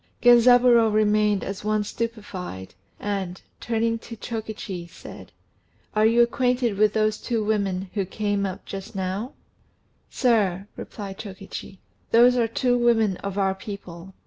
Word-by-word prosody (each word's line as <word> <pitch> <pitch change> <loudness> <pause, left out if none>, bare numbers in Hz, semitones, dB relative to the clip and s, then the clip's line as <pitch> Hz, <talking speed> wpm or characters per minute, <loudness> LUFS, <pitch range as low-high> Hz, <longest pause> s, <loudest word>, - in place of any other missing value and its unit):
Genzaburô 240 -1 +6
remained 210 -1 +2
as 195 +1 -5
one 215 0 +1
stupefied, 205 - -6 0.3
and, 195 -3 -3 0.2
turning 230 0 -1
to 230 - -9
Chokichi, 215 -5 -6
said, - - -12 0.6
"Are 215 +1 +5
you 235 +1 +5
acquainted 245 -2 +1
with 210 +1 +3
those 215 -1 +1
two 230 -3 -1
women 195 -3 -1
who 200 -3 -1
came 205 +1 -1
up 190 -2 -4
just 195 0 -8
now?" 195 +7 -3 0.8
"Sir," 200 -7 +1
replied 195 -2 -8
Chokichi, 195 -1 -8 0.3
"those 245 +2 +6
are 235 -2 +2
two 245 +2 +1
women 225 -5 +3
of 200 0 -6
our 195 -1 +2
people. 190 -3 -9
210 Hz, 135 wpm, -24 LUFS, 195-230 Hz, 0.8 s, Genzaburô